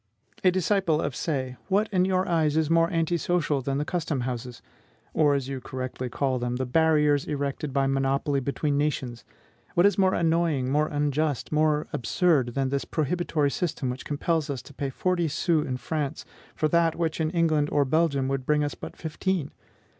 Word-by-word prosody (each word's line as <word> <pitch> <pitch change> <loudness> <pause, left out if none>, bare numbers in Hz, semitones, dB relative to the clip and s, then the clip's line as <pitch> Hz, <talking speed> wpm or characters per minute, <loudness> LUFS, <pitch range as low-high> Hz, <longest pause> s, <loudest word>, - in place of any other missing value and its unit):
A 185 - +6
disciple 185 -3 +1
of 135 - -2
Say, 130 -5 -2
what 205 +3 +2
in 185 -2 +3
your 185 0 +1
eyes 160 -4 +2
is 160 0 +1
more 165 0 +4
anti 165 -1 0
social 155 -5 0
than 135 +1 -2
the 145 - -1
custom 160 -6 -2
houses; 120 -1 -5 0.5
or, 150 -2 +3
as 135 -2 -2
you 135 -1 -5
correctly 130 0 -5
call 130 0 -1
them, 120 0 -2
the 130 +1 -2
barriers 150 +1 +3
erected 140 0 -3
by 135 0 +1
monopoly 135 +1 +1
between 140 +2 -1
nations? 130 -6 -2 0.5
What 175 - +5
is 205 0 +3
more 190 -1 +4
annoying, 165 -6 +1
more 150 +2 +2
unjust, 145 -1 -1
or - - 0
more 155 0 +2
absurd, 130 -1 +1
than 135 -1 0
this 140 0 -1
prohibitory 155 -2 0
system 150 -7 -2
which 125 - -7
compels 155 +1 -1
us 135 -4 -4
to 145 - -14
pay 140 0 -3
forty 175 +4 0
sous 155 +1 +1
in 125 - -2
France 150 +1 -3 0.3
for 155 - +1
that 170 -1 +3
which 165 -1 -1
in 155 - +1
England 155 -3 +1
or 145 -1 +3
Belgium 140 -2 +1
would 135 -1 -1
bring 150 +2 +2
us 145 - -2
but - - -9
fifteen? 165 -1 -2
150 Hz, 190 wpm, -26 LUFS, 135-165 Hz, 0.5 s, A